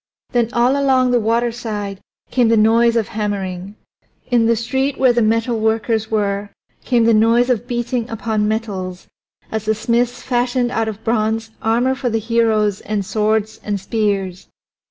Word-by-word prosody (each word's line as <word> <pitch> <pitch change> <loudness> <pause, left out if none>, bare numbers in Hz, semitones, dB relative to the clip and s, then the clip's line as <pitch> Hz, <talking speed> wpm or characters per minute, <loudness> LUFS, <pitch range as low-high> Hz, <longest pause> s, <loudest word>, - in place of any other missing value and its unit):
Then 240 -2 +1
all 245 +2 +2
along 260 -2 +3
the 245 - +3
waterside 225 -3 -2 0.3
came 245 -2 +3
the 225 0 +3
noise 230 +2 +4
of 225 -3 0
hammering; 200 -3 -4 0.6
in 235 -2 +3
the 230 - +3
street 265 +4 -1
where 255 -2 +4
the 240 - +2
metalworkers 220 0 0
were 205 -1 -1 0.3
came 240 -2 +2
the 230 - +4
noise 230 +3 +4
of 245 0 -1
beating 240 -1 -2
upon 215 -1 -1
metals 195 -5 -3 0.5
as 220 -1 -3
the 220 0 +1
smiths 235 +2 0
fashioned 245 0 0
out 225 -2 -1
of 220 0 -6
bronze 220 0 0
armor 240 +4 +2
for 260 -1 -2
the 225 - 0
heroes 220 -2 +1
and 205 -2 -3
swords 215 +1 0
and 205 -1 -2
spears. 195 -3 -2
225 Hz, 155 wpm, -19 LUFS, 215-240 Hz, 0.6 s, noise